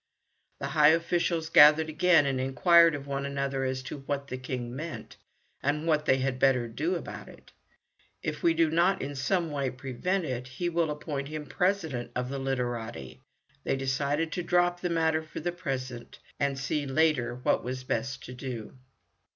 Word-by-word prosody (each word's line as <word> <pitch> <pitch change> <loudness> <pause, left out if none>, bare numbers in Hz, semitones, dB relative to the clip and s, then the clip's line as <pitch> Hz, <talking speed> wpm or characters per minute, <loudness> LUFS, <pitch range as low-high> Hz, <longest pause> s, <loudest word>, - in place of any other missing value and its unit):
The 140 - -4
high 150 +1 +5
officials 165 0 +1
gathered 155 0 +7
again 160 0 +4
and 135 -2 0
inquired 165 +5 +5
of 140 -1 -7
one 140 0 -3
another 140 -1 -2
as 130 0 -2
to 140 - -6
what 140 0 -3
the 130 - -4
King 125 -2 -5
meant, 155 +4 -7 0.5
and 150 +3 0
what 155 -2 +2
they 130 - +5
had 130 -1 -1
better 130 -3 +3
do 155 +11 -2
about 170 - -7
it. - - -16 0.7
"If 150 -1 -3
we 165 -1 +3
do 165 -1 +3
not 175 +4 +3
in 145 - -4
some 160 +5 0
way 140 -2 -1
prevent 135 +9 -2
it, 125 -3 -4
he 155 +7 -3
will 170 -2 0
appoint 150 -2 -4
him 155 0 -5
as - - -16
President 160 -11 -1
of 125 0 -2
the 140 0 -4
Literati." 120 -2 -4 0.4
They - - 0
decided 140 +4 -1
to 180 - -2
drop 175 0 +2
the 180 - -1
matter 160 -1 +1
for 155 - -8
the 175 +3 -2
present, 130 -8 -5 0.2
and 140 -1 0
see 140 +2 -2
later 135 -4 +1
what 125 - 0
was 130 +1 -4
best 130 +2 -3
to 125 - -8
do. 125 -2 -7
140 Hz, 185 wpm, -28 LUFS, 130-160 Hz, 0.7 s, gathered